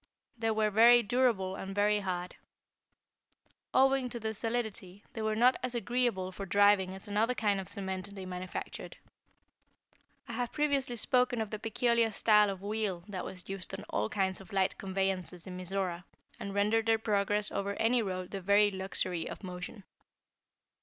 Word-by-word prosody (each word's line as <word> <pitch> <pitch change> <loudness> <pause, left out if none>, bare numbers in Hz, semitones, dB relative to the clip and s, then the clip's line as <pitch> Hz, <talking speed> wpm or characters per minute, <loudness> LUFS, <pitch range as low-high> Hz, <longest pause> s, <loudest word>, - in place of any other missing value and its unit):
They 225 -1 -1
were 215 -1 +1
very 235 +3 +7
durable 210 -5 +1
and 195 0 -6
very 210 +1 +3
hard. 180 -2 -4 1.4
Owing 270 -1 +3
to 235 - -5
their 220 0 -3
solidity, 220 -4 -3
they 225 - -5
were 215 0 0
not 245 +3 +4
as 250 -1 -3
agreeable 235 -5 0
for 195 +1 -7
driving 200 -1 +4
as 190 - -9
another 220 +4 +1
kind 205 -4 +1
of 190 - -10
cement 190 0 -5
they 190 -1 -7
manufactured. 180 0 -6 1.3
I 235 - -6
have 245 +1 -2
previously 280 -4 0
spoken 250 +1 +2
of 220 -2 -3
the 215 - -4
peculiar 230 +1 +1
style 210 0 +4
of 195 -1 -5
wheel 205 -4 -2
that 190 -3 -4
was 180 -1 -9
used 195 0 -5
on 200 +2 -8
all - - 0
kinds 190 -3 -1
of 190 - -14
light 190 -1 +1
conveyances 190 -2 -1
in 185 - -7
Mizora, 185 -1 -3 0.4
and 200 - -5
rendered 215 +2 +2
their 225 0 +4
progress 210 -1 0
over 200 0 -2
any 235 +3 +2
road 185 -3 -4
the 195 - -4
very 205 +2 +4
luxury 190 -3 -2
of - - -8
motion. 180 +3 -7
205 Hz, 165 wpm, -31 LUFS, 190-225 Hz, 1.4 s, very